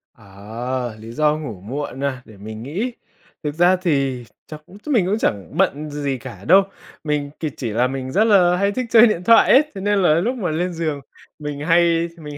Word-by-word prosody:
Ờ, 115 +4 -6
lý 110 +1 -10
do 150 +4 +1
ngủ 115 -12 -7
muộn 135 +5 -5
à? 135 -2 -2
Để 110 - -15
mình 110 +2 -8
nghĩ. 190 - -3 0.5
Thực 150 -1 -3
ra 175 +3 +4
thì 140 -8 -1 0.2
chắc 155 -1 -9
cũng 195 - -15
mình 240 -11 +2
cũng 200 +4 0
chẳng 100 - -2
bận 155 -5 0
gì 145 -2 -3
cả 100 -5 -11
đâu. 195 +3 +6 0.4
Mình 150 -2 -2
thì 155 - -2
chỉ 120 - -3
là 120 +4 +1
mình 130 0 -5
rất 200 +8 +3
là 185 -5 +4
hay 200 +2 +1
thích 255 +3 -3
chơi 230 +1 +7
điện 180 -5 -1
thoại 230 +4 +6
ấy, 275 - +7
thế 195 - -6
nên 205 0 +1
là 175 -5 +4
lúc 225 +11 0
mà 185 -8 -2
lên 175 +3 -2
giường 155 -4 -3 0.4
mình 150 -1 -5
hay 165 +1 +2
mình 150 -3 -9
150 Hz, 215 wpm, -20 LUFS, 130-180 Hz, 0.5 s, chơi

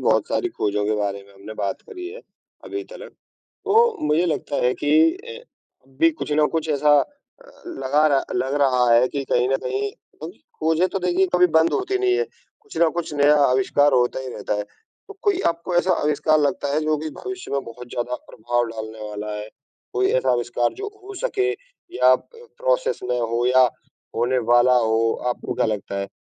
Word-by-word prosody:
बहुत - - +2
सारी 365 - 0
खोजों 105 - -1
के 110 - +1
बारे 100 -1 -2
में 100 - -19
हमने 100 +2 -10
बात 100 -2 -3
करी 360 -4 -7
है, 475 +4 -10 0.4
अभी 390 0 -5
तक - - -10
तो, 445 +3 -1
मुझे 155 +4 +2
लगता 155 -3 -2
है 125 - +3
कि 145 - -2 0.3
अ, 470 +4 -10 0.5
अभी 150 +5 +3
कुछ 150 -1 -5
ना 150 +1 +3
कुछ 160 -1 -1
ऐसा 150 0 +2
अ, - - 0 0.6
लगा 150 - +1
रहा 140 -3 +3
लग 140 -6 -1
रहा 125 -2 +3
है 120 +2 +5
कि 140 -1 -4
कहीं 125 +1 +3
न 135 - +2
कहीं 135 +2 -2 0.3
उम, 160 - -5 0.3
खोजें 160 +3 +2
तो 195 - -3
देखिए 180 +1 +1
कभी 180 0 +6
बंद 160 +1 +2
होती 390 0 0
नहीं 380 -1 +2
है, 465 - +1 0.4
कुछ 425 -1 -15
न 170 - +5
कुछ 170 -3 -3
नया 145 +1 +5 0.2
आविष्कार 140 +3 +3
होता 125 0 +2
ही 130 - -6
रहता - - -3
है। 105 - -2 0.4
तो 405 - -10
कोई 400 -2 +2
आपको 170 +2 -1
ऐसा 180 +2 +3
आविष्कार 150 +1 +2
लगता 150 0 0
है 155 - +2
जो 155 0 +1
कि 155 +1 -4
भविष्य 380 -1 -6
में 140 - +1
बहुत 125 +1 -10
ज़्यादा 125 +1 -3 0.2
प्रभाव 120 +2 -1
डालने 110 -1 -7
वाला 105 0 -5
है? 105 0 -7 0.4
कोई 125 +1 +1
ऐसा 130 0 +2
आविष्कार 120 0 0
जो 400 +3 -6 0.2
हो 400 +1 -9
सके 400 -5 +1 0.5
या 125 +1 +6
प - - -22 0.3
प्रोसेस - - 0
में 125 0 0
हो 115 +1 -1
या 130 +1 +5 0.5
होने 125 +2 +1
वाला 120 +1 +5
हो। 110 -2 +2 0.3
आपको 125 - -3
क्या - - +1
लगता 100 -2 -3
है, 100 - -3
145 Hz, 200 wpm, -22 LUFS, 120-180 Hz, 0.6 s, कभी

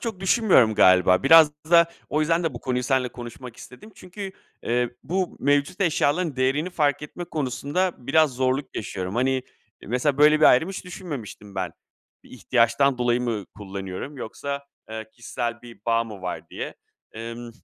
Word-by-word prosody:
çok 225 -6 -5
düşünmüyorum 190 - +4
galiba. 90 -2 +5
Biraz 155 +2 +7 0.2
da 170 -1 +7 0.2
o 155 - 0
yüzden 165 +3 +2
de 160 -6 -2
bu 120 - -7
konuyu 125 -1 -1
seninle 130 -1 +1
konuşmak 120 0 -10
istedim. 130 - -13
Çünkü, 190 +2 -8 0.3
eee, 120 0 0
bu 185 +2 -2
mevcut 145 +6 +1
eşyaların 160 -3 +1
değerini 140 +7 0
fark 150 -4 +1
etme 175 +4 -7
konusunda 155 +4 -1
biraz 145 +2 +2
zorluk 130 +1 -1
yaşıyorum. 95 -2 -4
Hani, 130 +1 +1 0.4
mesela 130 +5 0
böyle 150 +1 +6
bir - - +6
ayrım 145 +9 +5
hiç 195 -1 -6
düşünmemiştim 145 - -8
ben. 90 -3 -3 0.5
Bir - - -18
ihtiyaçtan 125 +2 +2
dolayı 120 0 +1
mı 115 -5 -2
kullanıyorum 95 +7 -6
yoksa, 140 +4 -5 0.3
eee, 110 0 -6
kişisel 120 0 -5
bir 120 -1 -13
bağ 115 0 +2
mı 105 -4 -10
var 90 -1 -5
diye? - - -6 0.4
Emm, 115 +1 -7
130 Hz, 160 wpm, -24 LUFS, 115-155 Hz, 0.5 s, Biraz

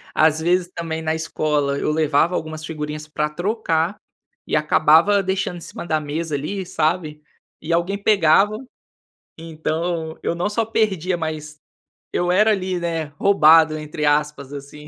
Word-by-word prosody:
Às 155 0 +3
vezes 175 +2 +1
também, 160 -1 -4
na 160 0 -1
escola 150 -3 -1
eu 150 - -1
levava 155 +2 +2
algumas 155 0 -5
figurinhas 150 -1 -5
para 150 0 -2
trocar, 175 0 -1 0.5
e - - 0
acabava 160 +6 +4
deixando 190 -1 -2
em - - -10
cima - - -8
da 155 -2 0
mesa 150 +1 -3
ali, 185 +7 -4
sabe. 155 -2 -1 0.4
E 165 +2 -2
alguém 175 +4 0
pegava. 200 0 +4 0.8
Então, 160 0 -3
eu - - 0
não 180 +4 -1
só 225 +1 0
perdia 190 -5 0
mas, 155 -2 -5 0.6
eu 175 0 +1
era 210 +4 +4
ali, 185 -3 -1
né, 165 -2 -2
"roubado", 160 -5 +5
entre 150 0 -4
aspas 145 -1 0
assim. 145 +1 -10
160 Hz, 150 wpm, -21 LUFS, 150-180 Hz, 0.8 s, roubado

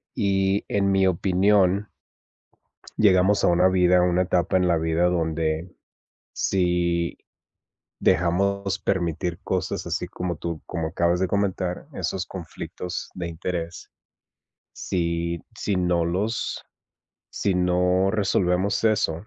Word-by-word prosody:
Y, 95 0 +1
en 100 -1 +1
mi 95 -1 +3
opinión 95 +2 +2 1.1
llegamos 100 0 +4
a - - +5
una 90 +2 +4
vida, 90 -1 +4
a - - +3
una 90 +1 +2
etapa 90 +1 +1
en 90 -1 +2
la 85 - +3
vida 80 +2 +1
donde 80 0 -1 0.6
si 85 -2 0 0.8
dejamos 100 +3 +1
permitir 85 -2 -1
cosas - - -2
así - - -2
como 90 -2 -4
tú, 85 -2 -5
como 80 -3 -3
acabas 85 +1 +1
de 95 - +1
comentar, 95 -2 -1
esos 95 -1 -3
conflictos 90 0 -7
de 85 -2 -4
interés, 85 0 -5 0.8
si 85 -1 -2 0.2
si 100 - -1
no 90 -2 +1
los 100 +7 -2 0.7
si 100 -2 -1
no 90 +1 +2
resolvemos 95 -1 +1
eso 100 -4 +1
90 Hz, 120 wpm, -24 LUFS, 85-95 Hz, 1.1 s, a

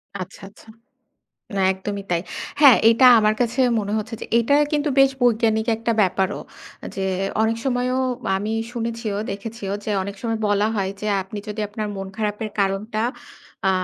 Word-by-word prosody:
আচ্ছা, 185 - -7
আচ্ছা। 210 - -20 0.9
না - - 0
একদমই 200 +1 -5
তাই। 170 - +1 0.4
হ্যাঁ, 280 -5 +8
এটা 230 +3 +5
আমার 215 0 +3
কাছে 240 +2 -1 0.2
মনে 205 -1 -3
হচ্ছে 220 +2 -5
যে - - -4
এটা 235 +5 +2 0.2
কিন্তু 300 0 +1
বেশ 270 0 +6
বৈজ্ঞানিক 225 -2 +2
একটা 230 +1 -1
ব্যাপারও। 190 +1 0 0.5
এ - - -4
যে 195 - -2 0.4
অনেক 225 +1 +1
সময়ও 255 0 0 0.4
আমি 210 +2 -3 0.2
শুনেছিও 230 -3 -3
দেখেছিও 200 0 -5
যে 215 - -1
অনেক 200 +1 -6
সময় 225 -2 -2
বলা 205 +1 +2
হয় 195 -2 -1
যে 215 - -2 0.2
আপনি 200 +2 -8
যদি 215 +1 -4
আপনার 210 +1 -4
মন 195 0 -5
খারাপের 215 0 -2
কারণটা 200 +3 0 0.7
আ - - +5
215 Hz, 165 wpm, -22 LUFS, 200-230 Hz, 0.9 s, হ্যাঁ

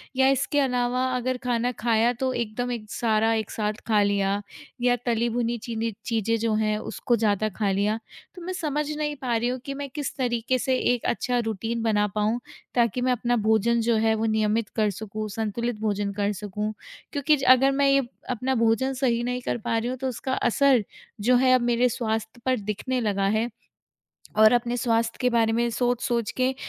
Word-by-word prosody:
या 265 0 +4
इसके 275 +2 +1
अलावा 250 -1 +1
अगर 250 +1 -1
खाना 245 0 0
खाया 230 +1 +2
तो 260 - +1
एकदम 240 +1 -2
एक 215 -3 -5
सारा 225 -1 +2
एक 220 -2 -2
साथ 210 -1 -1
खा 215 -2 +4
लिया 200 0 +1 0.4
या 245 0 +3
तली 235 0 +1
भुनी 235 0 -1
चीनी 230 -1 -2
चीज़ें 230 -1 0
जो 225 0 0
हैं 215 -1 +1
उसको 240 +2 -1
ज़्यादा 215 -1 +1
खा 205 -3 +1
लिया। 205 +3 0 0.4
तो 360 - -10
मैं 370 - -3
समझ 300 -4 -1
नहीं 295 -1 -2
पा 245 -3 0
रही 235 +2 +1
हूँ 255 +1 -3
कि 275 - -4
मैं 280 0 -5
किस 285 +1 -5
तरीके 245 0 0
से 260 +1 +1 0.2
एक 245 - -4
अच्छा 245 +1 0
रूटीन 225 +1 -2
बना 210 -2 +2
पाऊँ, 215 +3 +1 0.4
ताकि 240 0 +2
मैं 255 +1 +2
अपना 245 0 +1
भोजन 220 +1 +2
जो 230 0 +2
है 220 0 +2
वो 220 +1 -1
नियमित 215 0 +1
कर 215 -2 +2
सकूँ, 215 +2 -5
संतुलित 225 +2 -3
भोजन 205 -2 -1
कर 205 +1 +1
सकूँ। 210 +1 -4 0.4
क्योंकि 295 +1 +3
ज 270 - -6
अगर 265 +2 +5
मैं 280 +1 +2
ये 275 0 +4 0.3
अपना 255 +2 -1
भोजन 230 +3 +2
सही 250 -3 +1
नहीं 250 +1 -2
कर 245 - -2
पा 230 0 -1
रही 230 +2 -1
हूँ, 255 - -3
तो 265 +1 -3
उसका 260 +1 -3
असर 260 -2 +3 0.4
जो 250 +4 +4
है 255 +1 +4
अब 255 - +4
मेरे 240 +1 +2
स्वास्थ्य 225 0 -3
पर 255 -3 +2
दिखने 210 +5 -2
लगा 200 -3 0
है। 230 +2 0 0.9
और 215 0 +7
अपने 240 0 +1
स्वास्थ्य 230 -1 0
के 250 - +3
बारे 230 -2 +2
में 235 +1 +1
सोच-सोच 240 -1 0
के 255 +1 +2
235 Hz, 200 wpm, -25 LUFS, 220-250 Hz, 0.9 s, और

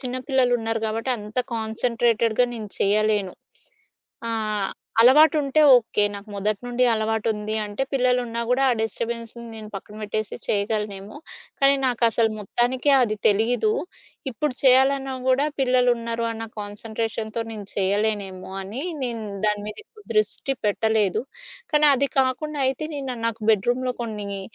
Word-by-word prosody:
చిన్న 255 -1 -3
పిల్లలున్నారు 245 -4 +1
కాబట్టి 225 +4 -2
అంత 210 +3 -6 0.2
కాన్సంట్రేటెడ్‌గా 230 +1 +1
నేను 215 -2 -6
చేయలేను. 210 -1 +2 1.0
ఆ! - - -2 0.7
అలవాటుంటే 295 +3 +5
ఓకే. 225 -3 +2
నాకు 200 +1 -8
మొదటి 200 +1 -1
నుండి 245 +1 0
అలవాటుంది 220 -1 -1
అంటే 210 +5 -3
పిల్లలున్నా 250 -2 +1
కూడా 260 +2 +3
ఆ 250 - +4
డిస్టర్బెన్స్‌ని 230 +1 -4
నేను 215 -1 -9
పక్కన 200 +2 -8
పెట్టేసి 215 0 -3
చేయగలనేమో. 210 +1 -2 0.4
కానీ 275 0 +5
నాకసలు 230 -2 +2
మొత్తానికే 245 +7 0
అది 215 -3 +1
తెలీదు. 235 - +2 0.6
ఇప్పుడు 275 +5 -2
చేయాలన్నా 270 +1 +4
గూడా 260 +2 +3
పిల్లలున్నారు 240 -3 +1
అన్న 225 0 -5
కాన్సంట్రేషన్‌తో 220 +2 -4
నేను 210 -2 -7
చేయలేనేమో 195 -1 -1
అని 215 +9 -5 0.2
నేను 230 -3 -3 0.2
దాని 210 -1 -1
మీద 215 - -7
ఎక్కువ 430 -1 -19
దృష్టి 215 +5 0
పెట్టలేదు. 215 0 +1 0.5
కానీ 300 0 +5
అది 280 - +2
కాకుండా 285 +3 -1
అయితే 270 +4 -2
నేను 265 -4 -4
నాకు 225 -1 -4
బెడ్రూమ్‌లో 245 +5 0
కొన్ని 205 -4 -5
230 Hz, 125 wpm, -23 LUFS, 210-255 Hz, 1.0 s, అలవాటుంటే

